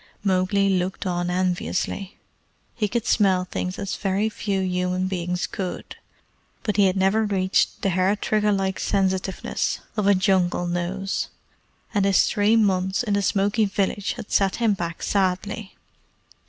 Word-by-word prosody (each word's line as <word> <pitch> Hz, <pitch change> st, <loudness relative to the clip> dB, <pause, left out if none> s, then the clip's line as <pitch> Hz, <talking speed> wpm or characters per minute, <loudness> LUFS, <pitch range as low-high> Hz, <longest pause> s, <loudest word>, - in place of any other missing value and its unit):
Mowgli 195 Hz, +1 st, +2 dB
looked 190 Hz, +1 st, -1 dB
on 175 Hz, -1 st, -1 dB
enviously. 185 Hz, +2 st, -2 dB, 0.6 s
He 215 Hz, -3 st, -1 dB
could 235 Hz, +2 st, -2 dB
smell 190 Hz, -4 st, +3 dB
things 185 Hz, 0 st, -4 dB
as 200 Hz, -1 st, -3 dB
very 200 Hz, +2 st, 0 dB
few 200 Hz, -2 st, -2 dB
human 180 Hz, 0 st, 0 dB
beings 180 Hz, -1 st, -2 dB
could, 185 Hz, -2 st, -5 dB, 0.7 s
but 210 Hz, -, -1 dB
he 200 Hz, -, +6 dB
had 185 Hz, +1 st, 0 dB
never 195 Hz, +4 st, +3 dB
reached 190 Hz, -2 st, +1 dB
the 195 Hz, -, +2 dB
hair 185 Hz, +3 st, +2 dB
trigger 210 Hz, 0 st, +1 dB
like 195 Hz, -1 st, -1 dB
sensitiveness 190 Hz, -1 st, -1 dB, 0.2 s
of 210 Hz, -2 st, 0 dB
a 200 Hz, -, +6 dB
Jungle 185 Hz, -2 st, +2 dB
nose; 175 Hz, +3 st, -2 dB, 0.7 s
and 200 Hz, -2 st, +2 dB
his 195 Hz, -1 st, +5 dB
three 210 Hz, +1 st, +2 dB
months 190 Hz, -2 st, +2 dB
in 210 Hz, -4 st, -1 dB
the 200 Hz, -, +2 dB
smoky 200 Hz, +3 st, +2 dB
village 195 Hz, 0 st, -1 dB
had 235 Hz, -4 st, -9 dB
set 195 Hz, -1 st, +2 dB
him 230 Hz, -3 st, +2 dB
back 170 Hz, -3 st, -5 dB
sadly. 195 Hz, +2 st, -1 dB
195 Hz, 150 wpm, -24 LUFS, 185-205 Hz, 0.7 s, he